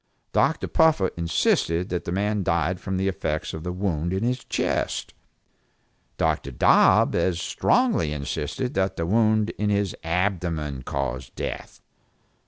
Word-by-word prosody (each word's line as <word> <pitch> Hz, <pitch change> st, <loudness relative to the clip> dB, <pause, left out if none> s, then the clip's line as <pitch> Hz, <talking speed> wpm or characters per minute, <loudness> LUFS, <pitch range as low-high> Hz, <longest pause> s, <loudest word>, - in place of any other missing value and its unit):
Dr. -, -, +2 dB
Puffer 155 Hz, -, +3 dB
insisted 85 Hz, +1 st, +1 dB
that 90 Hz, -1 st, -3 dB
the -, -, -3 dB
man 105 Hz, +2 st, 0 dB
died 85 Hz, 0 st, 0 dB
from 95 Hz, -1 st, -3 dB
the 95 Hz, +1 st, 0 dB
effects 80 Hz, -5 st, -2 dB
of 80 Hz, -, -6 dB
the 90 Hz, -, -3 dB
wound 90 Hz, -2 st, -2 dB
in 95 Hz, +4 st, -1 dB
the 125 Hz, -, +2 dB, 0.2 s
chest. -, -, -1 dB, 1.0 s
Dr. -, -, 0 dB
Dobb -, -, +4 dB
as 85 Hz, 0 st, +1 dB
strongly 240 Hz, -, +1 dB
insisted 75 Hz, -, -3 dB
that 95 Hz, 0 st, 0 dB
the 85 Hz, -, -2 dB
wound 110 Hz, +2 st, +2 dB
in 105 Hz, 0 st, +1 dB
the 100 Hz, -2 st, +1 dB
abdomen 85 Hz, -5 st, -1 dB
caused 65 Hz, -1 st, -4 dB
death. -, -, -6 dB
90 Hz, 140 wpm, -24 LUFS, 80-100 Hz, 1.0 s, Dobb